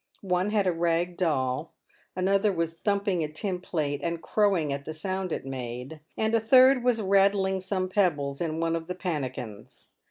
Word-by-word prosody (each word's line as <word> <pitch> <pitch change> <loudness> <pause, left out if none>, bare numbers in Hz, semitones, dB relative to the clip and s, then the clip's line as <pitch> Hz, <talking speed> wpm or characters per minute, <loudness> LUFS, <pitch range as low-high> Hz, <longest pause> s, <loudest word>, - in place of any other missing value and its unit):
One 180 +1 +1
had 210 -2 +1
a 185 - +3
rag 170 +1 0
doll; 150 -4 -1 0.4
another 195 +3 +2
was 165 -2 -2
thumping 200 -1 0
a - - -1
tin 180 +5 -4
plate, 150 -5 -2
and 170 0 -2
crowing 185 -7 +1
at 140 0 -5
the 155 +2 -6
sound 185 +2 -3
it - - -3
made; 130 +2 -6 0.2
and 220 0 0
a 230 - +4
third 255 +3 +6
was 245 -2 +2
rattling 195 -1 +2
some 185 0 -2
pebbles 150 -8 0
in 160 -1 -2
one 165 0 0
of 165 -1 -5
the 180 - -4
pannikins. 130 - -5
175 Hz, 180 wpm, -27 LUFS, 155-195 Hz, 0.4 s, third